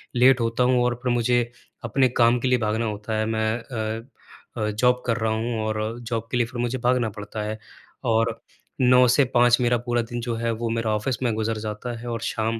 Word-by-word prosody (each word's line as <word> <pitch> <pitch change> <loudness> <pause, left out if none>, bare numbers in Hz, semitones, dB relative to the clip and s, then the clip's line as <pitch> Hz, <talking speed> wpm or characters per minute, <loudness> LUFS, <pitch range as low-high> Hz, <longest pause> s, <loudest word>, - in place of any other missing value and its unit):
late 125 +1 +5
होता 115 +2 +1
हूँ 125 -1 +3
और 125 -1 +1
फिर 125 - +1
मुझे 120 +1 +2 0.4
अपने 130 +2 +2
काम 120 0 +4
के 130 - -1
लिए 125 0 +3
भागना 110 +1 0
होता 105 +1 -3
है, 110 - 0
मैं 110 +1 0 0.4
अ 115 - -14 0.5
अ, 105 -1 0
जॉब 125 +3 +2
कर 115 -1 +1
रहा 110 -1 0
हूँ 115 +1 -2
और 110 +2 -2
जॉब 115 -1 -4
के 125 - +1
लिए 120 - +2
फिर 120 0 -7
मुझे 120 +2 -1
भागना 120 -2 +1
पड़ता 105 +1 -7
है 110 +1 -4 0.5
और 115 -1 +1 0.4
9 125 0 +6
से 135 +4 +4
5 120 +1 +5
मेरा 120 0 +3
पूरा 120 0 +1
दिन 120 +1 -5
जो 120 -1 -2
है 115 0 -1
वो 115 +1 -3
मेरा 115 -1 -1
ऑफ़िस 115 +3 -1
में 120 -3 +1
गुज़र 110 0 -1
जाता 110 +3 -5
है 120 - -8
और 115 -1 -3
शाम 115 0 -1
115 Hz, 225 wpm, -24 LUFS, 110-125 Hz, 0.5 s, 9